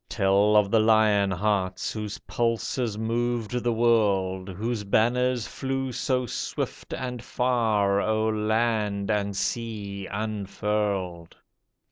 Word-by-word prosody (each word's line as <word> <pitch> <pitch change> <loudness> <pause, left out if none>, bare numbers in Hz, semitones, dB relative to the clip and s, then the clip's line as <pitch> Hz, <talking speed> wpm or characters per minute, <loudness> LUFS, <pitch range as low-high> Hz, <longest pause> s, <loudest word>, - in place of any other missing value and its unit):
Tell 100 0 +3
of 105 -2 +4
the 115 - +5
lion 110 -2 +4
hearts 95 -1 -1
Whose 105 -2 -5
pulses 115 -1 -1
moved 115 0 -1
the 120 - +2
world; 100 -5 +2
Whose 110 +4 -3
banners 120 +3 +2
flew 135 -1 -3
so 125 +1 0
swift 120 - -4
and 125 -2 -4
far, 110 -5 +1
O'er 110 0 +1
land 110 -2 0
and 100 -1 -1
sea 100 -4 -3
unfurled 100 -4 -2
110 Hz, 110 wpm, -26 LUFS, 100-115 Hz, -, the